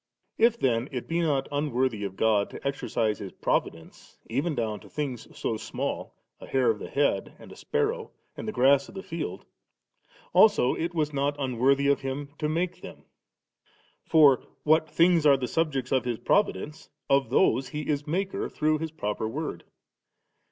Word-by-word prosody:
If 235 0 +4
then 120 0 +1
it 125 -3 -5
be 165 +1 0
not 140 -5 +1
unworthy 130 -6 0
of 95 -1 -6
God 105 -1 +2
to - - -6
exercise 115 -5 -1
His 95 -2 -7
Providence, 80 0 -3
even 145 +6 0
down 110 -4 -2
to - - -16
things 135 -6 -4
so 110 - -2
small, - - -4 0.2
a - - -11
hair 130 -3 +3
of 105 - -5
the - - -7
head, 145 0 0
and - - -14
a - - -11
sparrow, 455 +1 -2 0.3
and - - -7
the - - -1
grass 140 -2 +3
of - - -14
the 190 - -6
field, 165 - -5 0.9
also 185 - +5
it 170 +1 -3
was 150 -2 0
not 140 +1 0
unworthy 135 +1 +2
of 140 0 +3
Him 135 +1 -4
to 150 - -1
make 170 +3 -2
them. - - -11 1.0
For 150 -5 +5 0.2
what 155 +1 +3
things 170 +1 +4
are 140 -1 +6
the 130 -1 -3
subjects 135 -3 -1
of 130 -1 +2
His 120 -2 -1
Providence, 150 +13 0 0.2
of 135 -3 +2
those 130 -1 +3
He 150 0 -5
is 145 0 -1
Maker 190 +5 -2
through 155 0 0
His 160 +1 -3
proper 105 -7 -3
Word. 145 - -5
140 Hz, 175 wpm, -27 LUFS, 125-160 Hz, 1.0 s, are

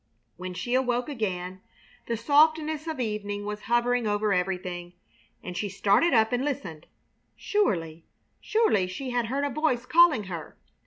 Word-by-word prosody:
When 180 0 -7
she 240 +7 -3
awoke 250 0 +1
again 185 -7 -4 0.5
the 230 - -1
softness 310 +4 +3
of 315 -4 -4
evening 205 -3 -3
was 210 0 -5
hovering 240 0 +2
over 205 0 +1
everything, 180 -1 -3 0.5
and 180 - -6
she 205 +3 -2
started 200 - +3
up 220 -1 +3
and 245 +1 +1
listened. 185 - -4 0.5
Surely, 165 - -1 0.3
surely, 430 - +2
she 250 +8 -5
had 240 -2 0
heard 275 +5 -1
a - - -1
voice 255 -3 0
calling 320 -7 +5
her! 175 -4 -8
220 Hz, 150 wpm, -27 LUFS, 185-270 Hz, 0.5 s, calling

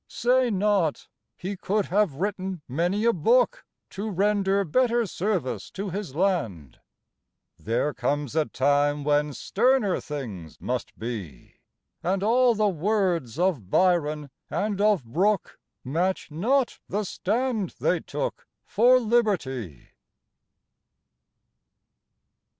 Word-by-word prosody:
Say 250 +1 +2
not, 195 -6 +1 0.3
"He 195 +3 -4
could 200 +2 -1
have 195 -6 +1
written 190 -1 -3
many 175 - 0
a 235 - +4
book, 230 +8 +2 0.3
To 205 +3 -4
render 200 0 +1
better 240 +6 +2
service 175 - -2
to 195 -1 -4
his 185 -7 -5
land." 115 - -1 0.8
There 120 +7 -1
comes 145 +2 -2
a 160 -1 +3
time 145 +1 +1
when 150 0 +2
sterner 235 - +1
things 110 - -7
must 125 -1 -4
be, 105 - -7 0.4
And 190 +3 0
all 240 +2 +4
the 215 0 +2
words 180 - 0
of 165 - 0
Byron 150 - +1 0.2
and 205 -1 -1
of 210 -8 +3
Brooke 190 - 0 0.2
Match 170 +6 -1
not 240 - +1
the 210 +2 -1
stand 220 +1 -1
they - - +2
took - - -5 0.2
for 245 +4 +5
liberty. 175 - -1
185 Hz, 110 wpm, -26 LUFS, 145-210 Hz, 0.8 s, for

